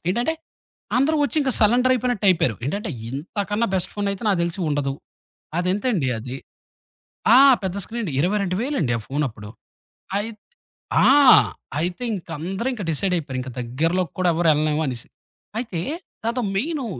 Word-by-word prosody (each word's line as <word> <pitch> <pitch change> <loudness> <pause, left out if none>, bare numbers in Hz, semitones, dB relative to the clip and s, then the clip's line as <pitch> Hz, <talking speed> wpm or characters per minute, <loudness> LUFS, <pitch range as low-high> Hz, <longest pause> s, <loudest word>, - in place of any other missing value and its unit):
ఏంటంటే, 240 - +1 0.6
అందరూ 290 +5 +3
వచ్చి 300 - -2
ఇంక 275 -2 +1
సలెండర్ 245 +4 +4
అయిపోయినట్టు 245 -4 0
అయిపోయారు. 165 - +1
ఏంటంటే 200 +8 -2 0.2
ఇంతకన్నా 205 - -2
బెస్ట్ 185 - -1
ఫోనయితే 200 -1 -2
నాకు 195 -3 +2
తెలిసి 170 +3 -2
ఉండదు. 145 -2 0 0.7
అదెంతండి 185 - 0
అది, 125 +3 -6 1.0
ఆ! - - +9 0.3
పెద్ద 190 0 -2
స్క్రీన్ 235 +1 -5
అండి, 165 -9 -3
22000 200 - 0
ఆ - - -4
ఫోన్ 145 +2 -1
అప్పుడు. 105 -1 -11 0.7
అయత్ 215 0 -4 0.7
ఆ! - - +7 0.7
అయితే 175 +7 -3
ఇంక 185 - -7
అందరూ 190 +9 -2
ఇంక 215 - -6
డిసైడ్ 180 +4 0
అయిపోయారు. 140 -5 -4
ఇంక 130 - -7
దగ్గరలోకి 165 +9 -1
కూడా 185 - +2
ఎవరు 165 0 +2
ఎళ్లలేమనేసి. 150 -5 -1 0.5
అయితే 220 -9 -3 0.4
దాంతో 235 +2 -1
మెయిను 275 +4 -1
185 Hz, 140 wpm, -22 LUFS, 155-230 Hz, 1.0 s, ఆ